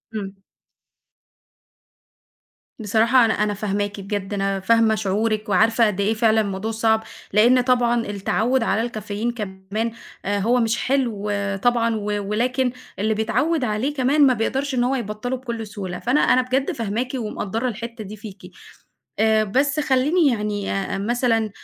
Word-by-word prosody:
إمم. 195 -2 -6 2.4
بصراحة 225 +4 +3
أنا 220 - +2
أنا 210 0 0
فاهماكِ 205 0 -2
بجد 200 0 -4
أنا 195 -1 -1
فاهمة 225 +2 +3
شعورِك 215 +1 -1
وعارفة 225 +4 +4
قد 200 -1 -3
إيه 215 +3 +2
فعلًا 220 0 +3
الموضوع 200 +2 -3
صعب، 220 0 +1 0.3
لإن 240 +4 +5
طبعًا 240 -2 +2
التعوِّد 220 +5 0
على 215 +1 +1
الكافيين 220 0 -3
كمان 210 +1 -4 0.3
أ 200 0 0
هو 240 +5 +2
مش 230 0 +1
حلو 235 -7 -1 0.3
طبعًا 230 -2 +2
و 210 - -4 0.3
ولكن 250 +3 0 0.3
اللي 220 +2 +1
بيتعوّد 250 +8 0
عليه 235 +6 -1
كمان 280 +1 +3
ما 255 - +4
بيقدرش 265 +4 -1
إن 245 - +2
هو 265 +2 +1
يبطله 235 +2 -3
بكل 235 -3 -5
سهولة، 195 -4 -6
فأنا 255 +5 +2
أنا 255 - +4
بجد 260 +2 -1
فاهماكِ 230 +3 -3
ومقدرة 225 0 -3
الحتّة 235 0 -6
دي 210 +1 -8
فيكِ، 205 -3 -10 0.8
آآ 220 0 +4
بس 275 +8 +1
خليني 295 +4 +2
يعني 210 -4 -1
آآ 195 0 -2
مثلًا 225 +1 +1
225 Hz, 145 wpm, -22 LUFS, 210-245 Hz, 2.4 s, لإن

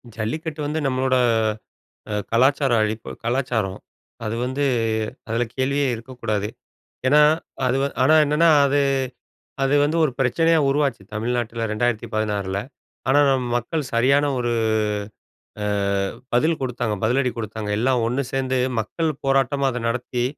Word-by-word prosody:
ஜல்லிக்கட்டு 150 +8 -4
வந்து 155 +2 -1
நம்மளோட 130 0 +1 1.0
அ - - -1 0.2
கலாச்சார 135 +3 +3
அழிப்பு 110 +1 -3
கலாச்சாரம் 120 -6 -1 0.5
அது 110 +1 -2
வந்து 130 +3 -1 0.6
அதில 115 +2 0
கேள்வியே 140 +2 +1
இருக்கக்கூடாது? 110 -3 -3 0.6
ஏன்னா 145 +3 +5 0.5
அது 130 +1 +2 0.3
ஆனா 155 - +5
என்னன்னா, 150 +3 +3 0.2
அது, 140 +1 +2 0.8
அது 135 +1 +2
வந்து 155 +3 0
ஒரு 135 - 0
பிரச்சனையா, 165 +6 +3
உருவாச்சு 135 -7 0
தமிழ்நாட்டில 115 0 -2
2016 105 -4 -1 0.5
ஆனா 140 +2 +5
நம்ம 130 -2 +1
மக்கள் 150 +7 -2
சரியான 140 +5 +3
ஒரு 120 -1 0 1.1
அ - - -1 0.7
பதில் 155 +6 +2
குடுத்தாங்க, 120 -4 -2
பதிலடி 125 +3 +2
குடுத்தாங்க. 110 -1 -5
எல்லாம் 125 -1 +2
ஒண்ணு 125 +4 0
சேந்து 130 -1 0 0.2
மக்கள் 160 +9 -1 0.2
போராட்டமா 135 0 +2
அத 125 -1 -4
நடத்தி 120 +1 -2
125 Hz, 120 wpm, -22 LUFS, 115-140 Hz, 1.1 s, ஏன்னா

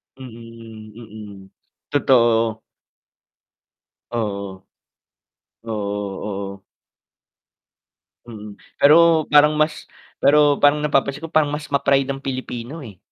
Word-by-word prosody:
Mm, 115 -3 -12
mm. 105 -4 -12 0.4
Totoo. 115 -5 +2 1.5
Oo. 100 -4 -5 1.0
Oo, 115 - -7 0.6
oo. 100 -1 -6 1.6
Mm. 105 -3 -11 0.2
Pero 160 +1 +5
parang 150 +1 +5
mas, 155 0 -1 0.4
pero 145 0 +4
parang 145 +1 +3
napapansin 140 -1 -1
ko - - -9
parang 155 -2 +1
mas 150 -2 -6
ma-pride 140 -1 +1
ang 135 0 -5
Pilipino, 130 +2 -6
eh. 105 -8 -12
125 Hz, 90 wpm, -20 LUFS, 110-145 Hz, 1.6 s, Pero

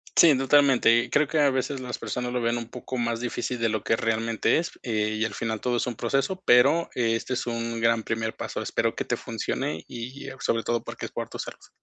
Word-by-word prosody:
Sí, 155 -6 +7
totalmente. 135 -4 +4
Creo 150 0 +3
que 155 +2 0
a 145 -1 +5
veces 130 +1 -1
las 125 -1 -5
personas 125 0 -3
lo 125 - 0
ven 115 +1 +1
un 115 -1 -5
poco 125 +1 -6
más 120 0 -1
difícil 125 0 -2
de 115 -1 +2
lo 110 -2 -2
que 115 - +2
realmente 115 0 +1
es, 170 - -2
eh, 110 -2 0
y - - +2
al 110 -2 -2
final 110 0 -3
todo 125 -1 0
es 120 - -1
un 120 - -3
proceso, 135 - -1
pero 125 +7 +5
este 115 +1 0
es 125 - -2
un 115 0 -2
gran 115 0 +2
primer 110 0 -2
paso. - - -4
Espero - - 0
que - - -3
te - - 0
funcione 80 +1 -3
y 125 +3 -7
a 135 - -9
sobre 115 0 0
todo 120 -1 -1
porque - - -6
es - - -8
por - - -4
tu - - -8
salud. - - -8
120 Hz, 240 wpm, -26 LUFS, 115-130 Hz, -, Sí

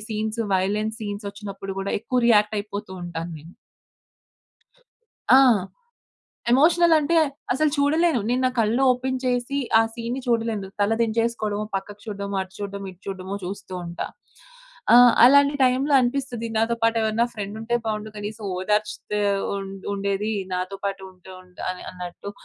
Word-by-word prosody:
Scenes 220 +1 -2
violence 210 +4 0
సీన్సొచ్చినప్పుడు 200 -1 -6
కూడా, 195 - -3
ఎక్కువ 250 +3 0
రియాక్టైపోతూ 210 -2 +1
ఉంటాను 170 -1 -5
నేను. 160 +4 -14 1.8
ఆ! - - +9 1.1
ఎమోషనలంటే 325 +2 +4 0.4
అసలు 305 +3 +2
చూడలేను. 310 0 +3
నేను 250 +1 +1
నా - - +2
కళ్ళు 230 +4 +2
ఓపెన్ 260 +1 -2
చేసి 250 +2 0 0.2
ఆ - - +5
సీన్‌ని 235 +2 -4
చూడలేను. 225 -4 0
తల 205 +2 +3
దించేసుకోవడమో, 220 -2 -1
పక్కకు 205 +1 -7
చూడ్డమో, 200 -1 -4
అటు 190 0 -13
చూడ్డమో, 200 -1 -5
ఇటు 180 +2 -24
చూడ్డమో 190 0 -5
చూస్తూ 195 +1 -7
ఉంటా. 170 0 -5 0.9
ఆ! - - +10 0.3
అలాంటి 280 +3 +6
టైంలో 265 +3 +2
అనిపిస్తది 245 -2 -2
నాతో 225 +1 +1
పాటు 230 0 +3
ఎవరైనా 220 +2 +1
ఫ్రెండ్ 205 -1 -5
ఉంటె 240 +2 0
బావుండు. 215 0 -3
కనీసం 210 +1 -6
ఓదార్చితే 210 +1 -1 0.4
ఉండు 195 -1 -7
ఉండేది 200 +2 -1 0.2
నాతో 185 +2 -3
పాటు 195 -1 -3
ఉంటె 185 0 -14
ఉంటా 180 -1 -13
ఆహ్, 180 - -10
అన్నట్టు. 180 +2 -8
215 Hz, 135 wpm, -24 LUFS, 195-240 Hz, 1.8 s, ఆ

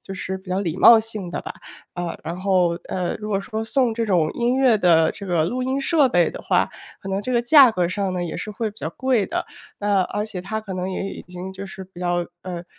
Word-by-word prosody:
就 195 - -8
是 190 +2 -4
比 190 - -17
较 185 +1 0
礼 170 -4 -2
貌 230 - +9
性 215 -5 -4
的 - - -3
吧。 - - -6 0.4
呃， 175 -1 -4
然 170 - -4
后， 185 -2 +3 0.2
呃， 180 -2 -2
如 210 - -5
果 200 - +1
说 220 +3 -4
送 245 0 +2
这 230 0 -2
种 170 -6 +2
音 240 +1 0
乐 250 -5 +4
的 165 -4 +4
这 200 - -9
个 170 -3 +1
录 250 +9 -2
音 260 +2 -1
设 285 0 +3
备 175 -7 +3
的 - - -8
话， - - +2 0.4
可 195 - -6
能 195 +1 -1
这 255 - -5
个 240 -1 +2
价 265 -1 +8
格 180 -5 0
上 190 +2 -2
呢， 180 -1 -2
也 170 - -5
是 215 - -5
会 215 +1 -3
比 210 - -17
较 - - -3
贵 240 +3 0
的。 - - -2 0.3
那， 205 -1 +2
而 205 +3 -2
且 205 -4 -6
他 220 +4 -4
可 200 - -7
能 185 +1 -3
也 195 +1 -3
已 - - -8
经 180 +1 -7
就 195 +1 -7
是 190 0 -9
比 180 -1 -14
较 175 -1 0 0.2
呃， 175 -2 -6
195 Hz, 275 characters per minute, -22 LUFS, 180-225 Hz, 0.4 s, 貌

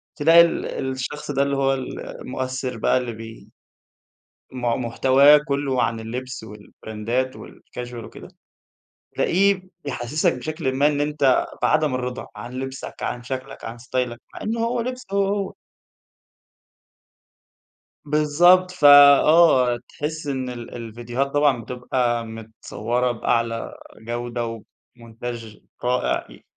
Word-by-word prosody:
تلاقي 165 +3 +7
ال 170 - +1 0.3
الشخص 145 +3 -5
ده 140 0 +2
اللي 140 0 -1
هو 135 0 +2
ال 130 -1 -5 0.2
المؤثر 130 -1 -4
بقى 110 - +2
اللي 125 -2 -3
بي 115 0 -11 1.0
م 125 -1 -6 0.2
محتواه 135 +5 +6
كُلّه 140 -2 0
عن 115 -1 -1
اللبس 125 +2 -6
والـبراندات 110 +4 -4
والcasual 125 0 -10
وكده، - - -11 0.9
تلاقيه 195 +1 +2 0.2
بيحسسَك 140 +3 0
بشكل 155 +2 -3
ما 140 +2 +3
إن 145 -1 0
أنت 145 -3 +2 0.2
بعدم 155 -4 +2
الرضا 125 0 -4
عن 120 +1 -8
لِبسَك، 130 +1 -6
عن 120 0 -3
شكلَك، 130 0 -6
عن 115 +1 -7
ستايلَك، 125 0 -3
مع - - -9
إنه 225 +2 -2
هو 235 +1 0
لبسه 255 +1 -5
هو 200 0 +3
هو. 200 -1 -2 2.5
بالضبط، 170 +5 +4
فآه 145 -3 +7
تحِس 155 0 -5
إن 130 -2 -2
ال 120 -1 -8
الفيديوهات 120 +3 -3
طبعًا 145 -3 +2
بتبقى 125 0 -1
متصوّرة 115 +2 -3
بأعلى 115 0 -1 0.3
جودة 120 +1 -4
وبمونتاچ 115 0 -9 0.3
رائع 125 +1 0
ي - - -27
130 Hz, 120 wpm, -23 LUFS, 120-145 Hz, 2.5 s, تلاقي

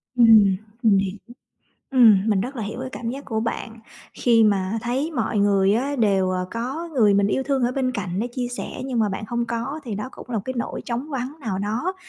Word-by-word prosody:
Ừm, 220 -5 +6 0.3
mình 205 -3 +5
hiểu. 195 +1 -1 0.7
Ừm, 220 -6 +6
mình 200 -3 +2
rất 255 +5 -4
là 225 - -3
hiểu 220 +5 -5
cái 260 - -4
cảm 230 -1 -4
giác 275 +2 -7
của 220 -1 -2
bạn, 230 0 -4 0.4
khi 230 -2 +4
mà 200 +1 +1
thấy 265 +7 -1
mọi 230 -6 -1
người 200 0 +3
á 275 +4 -1
đều, 195 -5 +2
ờ, 180 0 -2
có 265 +9 -4
người 210 -5 +4
mình 200 0 +3
yêu 265 +6 0
thương 270 -1 0
ở 245 - +1
bên 255 -1 -1
cạnh 190 -4 -3
để 240 - -1
chia 245 0 -4
sẻ, 245 +1 -6
nhưng 255 -3 -2
mà 215 -2 +2
bạn 195 +2 -4
hông 240 0 -1
có. 235 +7 -3
Thì 220 -4 -4
đó 210 +6 -4
cũng 250 - -12
là 230 - -1
một 200 - -2
cái 260 - -4
nỗi 235 - -3
trống 245 +5 -3
vắng 270 +2 -4
nào 195 -7 -3
đó 225 - -2
230 Hz, 240 wpm, -23 LUFS, 205-255 Hz, 0.7 s, Ừm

